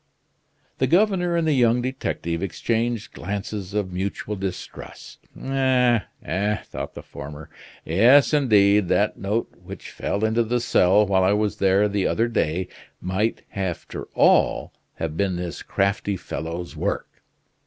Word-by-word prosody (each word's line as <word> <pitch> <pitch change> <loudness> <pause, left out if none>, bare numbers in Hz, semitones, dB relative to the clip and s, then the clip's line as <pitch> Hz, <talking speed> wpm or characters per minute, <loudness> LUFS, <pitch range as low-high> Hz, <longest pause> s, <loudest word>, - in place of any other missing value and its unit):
The 130 - +2
governor 180 +1 +2
and 165 -1 +1
the 155 - +3
young 120 -2 +3
detective 85 -10 -3
exchanged 115 +3 -2
glances 100 +1 -5
of 100 -3 -1
mutual 100 +3 -3
distrust. 95 -2 -7 0.2
"Eh! 130 -3 +2 0.2
eh!" 105 +2 0
thought - - -7
the - - -8
former, 75 +2 -9 0.3
"yes, 120 - +5
indeed, 105 -8 +4
that 105 +4 +1
note 105 +4 -2
which - - -9
fell 100 +2 -2
into 110 +2 +2
the 120 +2 0
cell 105 -4 +4
while 95 -2 +2
I 95 +2 +4
was 105 0 0
there 100 +2 +3
the 100 -2 0
other 115 +1 +1
day 90 -5 -1 0.3
might 95 +5 -1
after 95 -4 -4
all - - +3 0.2
have 80 -1 -4
been 95 0 0
this 90 -1 -5
crafty 100 0 -1
fellow's 85 +1 -6
work. - - -4
105 Hz, 140 wpm, -23 LUFS, 95-120 Hz, 0.3 s, yes